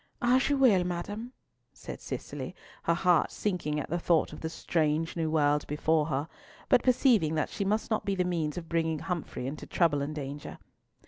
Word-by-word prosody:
"As 255 +2 +3
you 285 - +2
will, 225 -9 +5
madam," 205 +7 -4 0.4
said - - -9
Cicely, - - -6 0.3
her 170 - +3
heart 175 -2 +3
sinking 175 -7 -1
at 150 - -5
the 175 - 0
thought 170 -1 +2
of - - -9
the 160 - -2
strange 160 -1 0
new 165 -2 0
world 150 -2 +2
before 150 +1 +1
her, 145 0 -1 0.4
but 250 - +6
perceiving 235 - +3
that 155 - -1
she - - -2
must 210 +4 0
not 215 - +1
be 200 - -1
the 185 - +1
means 165 -4 -1
of 170 -2 -5
bringing 160 -1 0
Humfrey 170 -6 -4
into 140 +3 -5
trouble 155 -5 +2
and 150 +2 -3
danger. 145 0 -6
165 Hz, 190 wpm, -29 LUFS, 150-195 Hz, 0.4 s, but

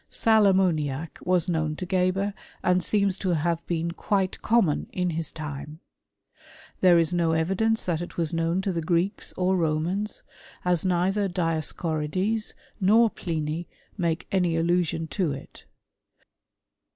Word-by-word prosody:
Sal 220 -2 +4
ammoniac 160 -6 +1
was 180 -2 +1
known 160 -3 0
to 185 - -5
Geber, 190 +2 +1 0.3
and 180 0 +3
seentf 200 0 +1
to 185 -3 0
have 165 +2 0
been 170 0 -1
quite 190 +1 -1
common 215 -10 +2
in 180 -1 -1
his 165 -1 -3
time. 150 0 -7 1.0
There 180 -2 +6
is 165 +1 +2
nHii: 165 -2 +2
evidence 220 +7 +1
that 170 -2 -1
it 175 - -7
was 165 -1 -1
known 165 +3 0
to 195 - 0
the 170 -2 -2
Greeks 175 +5 0
or 185 +1 +2
Romans, 175 +5 -1 0.4
as 180 -2 +2
neither 190 +2 +1
Dioscorides 170 +4 -1 0.2
nor 220 +3 +5
Pliny 160 0 -3 0.3
make 170 -2 -1
any 180 -4 +2
idlusiott'' 165 -1 0
to 175 -7 0
it. 135 - -11
175 Hz, 140 wpm, -26 LUFS, 160-190 Hz, 1.0 s, There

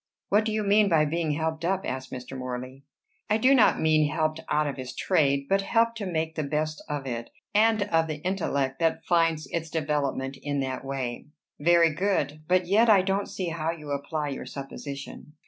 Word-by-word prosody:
"What 210 +2 +3
do 220 - -1
you 215 0 0
mean 205 0 +4
by 160 -3 +4
being 160 0 -1
'helped 160 +1 -2
up'?" 190 +2 0
asked 130 0 -4
Mr. 125 +1 -7
Morley. 130 +1 -6 0.5
"I 215 - +3
do 255 +5 +5
not 250 -5 +5
mean 155 -1 +3
helped 155 0 -1
out 150 0 +2
of 145 - -2
his 130 -1 -7
trade, 140 -6 +2
but 195 0 +2
helped 230 +3 +2
to 200 - -3
make 160 -2 -2
the 160 - -2
best 155 +2 -2
of 145 -2 -3
it, 115 -2 -4 0.2
and 220 0 +4
of 165 -5 +1
the 155 -1 -3
intellect 140 -8 -1
that 165 -1 0
finds 165 -3 +2
its 165 -1 -3
development 145 -4 -1
in 145 -1 -2
that 130 -1 -3
way." 135 -3 -4 0.3
"Very 170 +1 +4
good. 180 -4 -1
But 180 +1 +3
yet 215 +6 +4
I 200 -4 +6
don't 195 +1 -1
see 185 -3 -3
how 165 -1 -2
you 155 -3 -5
apply 145 +1 -2
your 135 - -6
supposition." 140 +1 -8
155 Hz, 200 wpm, -27 LUFS, 140-185 Hz, 0.5 s, I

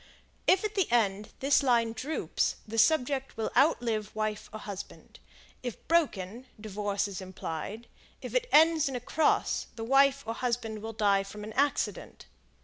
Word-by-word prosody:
If 375 +2 +5
the 390 - 0
end 210 -3 +2
at - - -26
this 275 +2 +4
line 235 -4 +2
droops 275 +8 -1
the 225 +1 -2
subject 270 -2 +2
will 220 - -2
outlive 235 -7 +2
wife 215 -1 -3
or 220 - -6
husband; 200 -2 -9 0.4
if 245 -4 -7
broken, 250 - 0
divorce 205 -1 -2
is 195 -1 -6
implied; 190 +4 -6 0.3
if - - -8
it - - 0
ends 315 -1 +5
in 265 - -5
a - - -1
cross, 295 +5 +1
the 225 - -5
wife 275 +3 +4
or 225 - -2
husband 230 -3 -2
will 225 +1 -5
die 205 -2 +3
from 205 +2 -9
an 215 +1 -7
accident. 285 +3 -1
230 Hz, 160 wpm, -29 LUFS, 210-275 Hz, 0.4 s, If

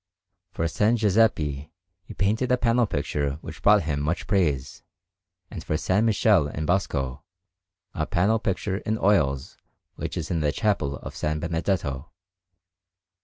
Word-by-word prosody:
For 95 -3 -4
S. 85 - -4
Giuseppe 105 -10 +2 0.3
he 95 - -12
painted 110 +6 0
a 125 - +4
panel 120 -1 +2
picture 70 -3 -2
which 80 - -9
brought 105 -1 +5
him 75 -2 -2
much 80 +5 -2
praise, 75 - 0 0.7
and, 85 -6 -7
for 80 - -3
S. 75 - -5
Michele 105 -4 +3
in 80 +2 -4
Bosco, 70 -8 -1 0.7
the 80 0 -2
panel 105 +6 +2
picture 95 -1 -2
in 110 +1 -2
oils 70 -11 +1 0.4
which - - -4
is - - -4
in 85 - 0
the 75 -2 +1
Chapel 90 -9 0
of - - -9
S. - - -10 0.2
Benedetto. 80 -3 -2
90 Hz, 145 wpm, -25 LUFS, 75-105 Hz, 0.7 s, brought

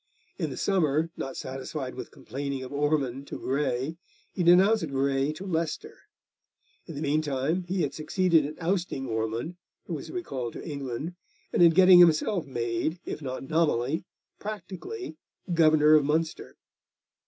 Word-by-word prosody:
In - - -1
the - - -7
summer, 160 -4 +1
not 135 - -5
satisfied 135 0 -5
with - - -7
complaining 140 0 -5
of 130 - -8
Ormond 140 -2 0
to - - -6
Grey, 135 +2 -1 0.4
he 185 - -2
denounced 185 +2 +5
Grey 135 +1 +1
to 180 +5 -8
Leicester. 165 -4 -2 0.9
In 165 - -7
the 145 - -4
meantime 150 +3 0
he 185 0 0
had - - -2
succeeded 165 +1 +2
in 150 +2 -6
ousting 170 -5 -1
Ormond, 115 +8 -3 0.3
who - - -5
was - - -6
recalled 130 - -4
to - - -8
England, 140 +2 -4 0.4
and - - +2
in 170 - +9
getting 180 +2 +7
himself 175 +1 +4
made, 120 +6 -2
if - - -5
not 130 -2 -5
nominally, 155 -3 +1 0.4
practically 215 - -7 0.4
Governor 155 -2 +5
of 155 -1 +6
Munster. 160 +3 -2
155 Hz, 145 wpm, -27 LUFS, 135-170 Hz, 0.9 s, in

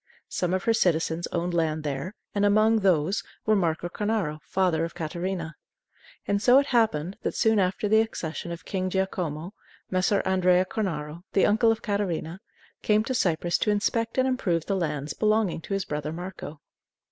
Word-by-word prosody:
Some 180 -1 -1
of 185 - -2
her 230 - +3
citizens 170 -4 +1
owned 175 +1 -2
land 160 -2 0
there, 150 +7 -4 0.2
and 205 - 0
among 215 +2 +4
these 185 -1 +2 0.2
was 215 - +4
Marco 170 -3 0
Cornaro, 200 -5 -2
father 180 -3 0
of 165 - -4
Catarina. 170 +1 -3 0.7
And 200 0 +1
so 245 +4 +6
it 280 - +4
happened 210 - +1
that, - - -2
soon 220 -2 +3
after 190 +2 0
the 220 +1 +5
accession 170 -6 -4
of 170 -1 -7
King 185 -1 -2
Giacomo, 180 -3 -2 0.4
Messer 190 +2 +2
Andrea 185 -1 +3
Cornaro, 165 -6 -3
the 195 - +4
uncle 225 +2 +4
of 225 0 -3
Catarina, 190 -4 -2 0.4
came 215 0 +3
to 260 - -2
Cyprus 175 -6 +1
to - - +1
inspect 225 +3 0
and 260 0 +3
improve 185 -11 0
the 195 - 0
lands 150 -5 -2
belonging 215 -5 +1
to 195 - -5
his 195 - -2
brother 150 0 -3
Marco. 175 -3 -7
185 Hz, 170 wpm, -26 LUFS, 165-210 Hz, 0.7 s, so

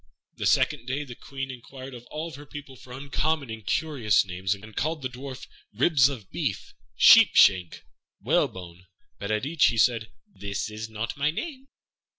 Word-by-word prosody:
The - - -1
second 120 - +2
day 140 +3 -2
the 130 -4 -9
Queen 135 +2 -6
inquired 130 +1 -10
of 120 0 -11
all 160 +2 -5
her 145 +2 -11
people 145 -2 -9
for 125 0 -15
uncommon 140 +1 -2
and 110 -1 -7
curious 120 -5 +1
names, 95 +2 -2
and 110 +2 -13
called 155 -1 -2
the 130 - -2
Dwarf 130 +1 -8 0.3
"Ribs 140 +1 +4
of 115 -9 -8
Beef," - - -3 0.2
"Sheep - - +8
shank," 90 -3 +4 0.4
"Whalebone," 90 0 -1 0.3
but 100 - -5
at 110 +3 0
each 155 0 +3
he 115 - 0
said, 115 -1 +2 0.2
"This 100 +2 -5
is 110 +1 -6
not 110 +4 -4
my 145 +2 +2
name." 270 - -5
125 Hz, 170 wpm, -26 LUFS, 110-145 Hz, 0.4 s, Sheep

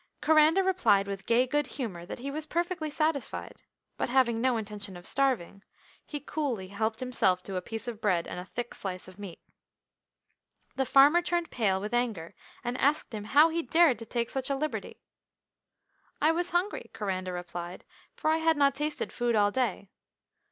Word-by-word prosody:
Coranda 315 +4 +5
replied 225 - +3
with 195 -1 -6
gay 240 +2 +4
good 295 +3 0
humour 185 -10 -5
that - - -6
he 275 +3 -5
was 310 +1 -5
perfectly 345 -2 -1
satisfied, 305 -1 -2 0.4
but - - -1
having 240 -3 +3
no 255 -1 +2
intention 205 -3 -6
of 175 - -13
starving, 250 -9 0 0.5
he 295 - -4
coolly 270 -11 -3
helped 220 +3 -2
himself 190 -8 +1
to 195 - -6
a 185 - -1
piece 225 +4 -5
of 230 -2 -5
bread 185 -6 +2
and - - -6
a 180 - -7
thick 240 +5 -5
slice 185 -2 -5
of 185 +1 -14
meat. 195 -4 -8 1.4
The 265 -1 0
farmer 290 +6 +6
turned 345 -1 -1
pale 195 -5 +1
with 210 +4 -5
anger, 225 -9 -1 0.3
and 245 +1 -3
asked 285 -2 +2
him 210 -1 -5
how 295 +8 +6
he 335 +1 -1
dared 320 -8 +4
to 230 - -7
take 235 0 -2
such 265 0 -2
a 275 - +1
liberty. 305 +3 -4 1.2
"I 310 +2 +4
was 350 +2 -1
hungry," 355 +4 -1
Coranda 185 -4 -3
replied, 175 0 -6 0.3
"for 395 -10 +1
I 320 - +3
had 325 -1 +2
not 280 -1 +4
tasted 295 +1 -3
food 240 -1 0
all 205 -1 +4
day. 230 -5 -2
240 Hz, 180 wpm, -29 LUFS, 200-300 Hz, 1.4 s, farmer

